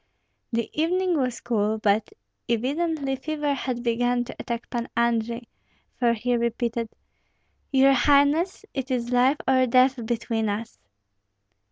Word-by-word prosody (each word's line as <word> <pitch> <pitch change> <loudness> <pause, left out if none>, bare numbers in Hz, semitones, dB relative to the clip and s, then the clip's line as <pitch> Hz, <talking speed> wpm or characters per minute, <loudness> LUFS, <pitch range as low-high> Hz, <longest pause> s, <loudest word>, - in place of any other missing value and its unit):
The 230 -1 -1
evening 360 +3 +1
was 255 -5 -1
cool; 215 -2 0
but 210 0 +1 0.4
evidently 275 +4 0
fever 295 +1 -2
had 250 -3 -3
begun 245 +1 +1
to 245 - -9
attack 235 0 -4
Pan 240 -1 -3
Andrei, 235 0 0 0.5
for 240 -2 +3
he 245 +2 0
repeated, 235 -1 -1 0.8
"Your 270 0 +5
highness, 290 - +3
it 270 -1 -4
is 245 -2 -1
life 255 +4 +4
or 260 -1 +4
death 255 0 +3
between 225 -2 -1
us!" 205 - -5
245 Hz, 130 wpm, -25 LUFS, 235-275 Hz, 0.8 s, Your